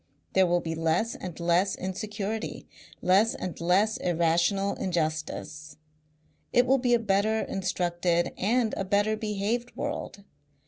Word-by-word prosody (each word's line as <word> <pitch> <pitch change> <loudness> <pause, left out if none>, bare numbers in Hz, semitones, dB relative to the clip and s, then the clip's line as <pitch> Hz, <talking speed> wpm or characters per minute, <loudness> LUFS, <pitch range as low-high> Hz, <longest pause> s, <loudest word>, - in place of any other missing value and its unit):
There 190 -1 +4
will 175 0 +2
be 165 -1 -3
less 165 +8 0
and 180 -3 -7
less 175 +3 +2
insecurity, 210 +3 -4 0.4
less 195 +5 +4
and 180 -2 -6
less 195 +6 +3
irrational 175 +3 +1
injustice. 155 -3 -3 0.7
It 245 - +4
will 265 +2 +3
be 245 -1 +3
a - - +4
better 215 +1 +1
instructed 175 -2 -1
and 230 +2 +1
a - - -1
better 205 +3 +1
behaved 215 +3 -2
world. 285 -8 -5
195 Hz, 130 wpm, -27 LUFS, 175-215 Hz, 0.7 s, There